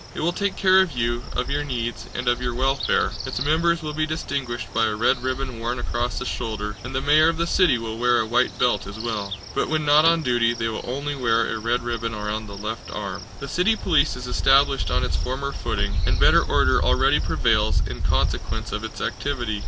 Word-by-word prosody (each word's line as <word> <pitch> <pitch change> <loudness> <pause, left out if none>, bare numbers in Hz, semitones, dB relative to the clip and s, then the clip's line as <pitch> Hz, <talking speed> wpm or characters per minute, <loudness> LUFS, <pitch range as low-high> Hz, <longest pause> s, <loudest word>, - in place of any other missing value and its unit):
It - - -4
will 170 +3 +1
take 200 0 -1
care 190 0 +5
of 190 -5 -1
you, 120 -1 -1
of 125 - -2
your 145 +1 0
needs, 120 -4 -4
and 125 0 -4
of 120 0 +2
your 120 -1 -2
welfare. 135 +2 +1
Its - - -4
members 170 +2 +2
will 150 -1 -4
be 155 +1 -1
distinguished 125 -9 -4
by 115 0 +2
a 105 - -1
red 120 +3 +2
ribbon 130 -1 -3
worn 120 +2 -2
across 120 0 -2
the - - -3
shoulder, 105 -3 -4
and 125 +3 -6
the 130 - 0
mayor 155 +3 +5
of 165 - -2
the 170 - 0
city 170 -6 +3
will 115 -1 -5
wear 120 0 +3
a 110 - +1
white 115 +2 +1
belt 120 -6 +1
as 100 - -8
well. 110 -4 -3 0.2
But - - -1
when 155 -1 0
not 150 +1 +6
on 165 0 +4
duty 120 -2 +2
they 115 -1 -2
will 110 - -5
only 140 +3 -3
wear 115 -4 +1
a - - -4
red 115 +2 -1
ribbon 115 -1 -3
round 105 0 -4
the 100 - -8
left 110 +2 -6
arm. 100 -1 -5 0.2
The 140 - -5
city 180 +10 +2
police 155 -9 +2
is 125 0 -7
established 135 +2 +3
on - - +1
its - - -1
former 140 +2 -3
footing, 100 -5 -2
and 95 -2 +1
better - - +6
order - - +2
already - - +3
prevails - - +1
in - - -6
consequence - - -1
of 105 +1 -3
its 110 - -7
activity. 120 -7 -2
125 Hz, 225 wpm, -23 LUFS, 115-145 Hz, 0.2 s, not